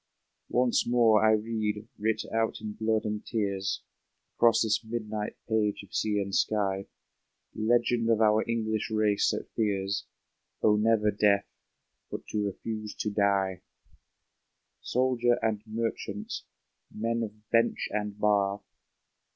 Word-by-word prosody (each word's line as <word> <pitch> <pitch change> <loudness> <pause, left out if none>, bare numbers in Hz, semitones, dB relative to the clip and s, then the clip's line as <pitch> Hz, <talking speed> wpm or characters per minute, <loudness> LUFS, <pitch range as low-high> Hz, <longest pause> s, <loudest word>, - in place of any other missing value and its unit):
Once 125 0 +2
more 115 -3 +4
I 110 0 +6
read, 110 -1 -1
writ 110 +1 +1
out 115 0 0
in 105 -1 -5
blood 110 0 0
and 105 0 -3
tears, 100 -3 -2 0.5
Across 115 -1 +4
this 110 0 +1
midnight 110 -2 -4
page 105 -2 0
of 100 - -17
sea 105 -1 +1
and 100 -1 -3
sky, 100 -2 +1 0.7
The - - -6
legend 120 +1 +2
of 115 -1 +3
our 110 0 +4
English 110 -2 -1
race 110 -2 +2
that - - -4
fears, 100 -2 -1 0.6
never 105 0 +4
death, 100 -1 +3 0.6
but - - -6
to 105 -1 -1
refuse 110 +2 -5
to 105 - -2
die! 100 -3 +1 1.2
Soldier 125 -1 +2
and 110 -2 0
merchant, 110 -2 -3 0.6
men 115 +2 -1
of 105 -1 -7
bench 115 0 +2
and 105 -1 -3
bar. 100 -1 +1
110 Hz, 125 wpm, -29 LUFS, 105-115 Hz, 1.2 s, I